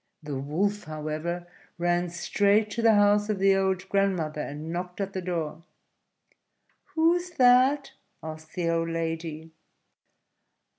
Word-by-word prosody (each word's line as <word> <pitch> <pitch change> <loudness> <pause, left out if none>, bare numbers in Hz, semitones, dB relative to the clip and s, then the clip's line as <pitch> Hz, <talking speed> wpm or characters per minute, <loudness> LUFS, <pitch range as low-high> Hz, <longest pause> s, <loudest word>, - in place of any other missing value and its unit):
The 150 -2 -4
Wolf, 195 +9 -1
however, 155 +3 -4 0.3
ran 175 0 +1
straight 205 +5 +1
to 230 - -2
the 225 -1 +5
house 205 +1 +4
of 210 - 0
the 195 0 +4
old 190 -1 0
grandmother, 185 -7 0
and 150 +3 -6
knocked 180 +1 -5
at 195 -1 -3
the 185 - -3
door. 165 -3 -3 1.3
"Who's 345 +2 +2
that?" 260 +3 +5 0.3
asked 155 0 -9
the 175 -2 -1
old 165 0 0
lady. 165 -1 -4
180 Hz, 130 wpm, -27 LUFS, 160-205 Hz, 1.3 s, the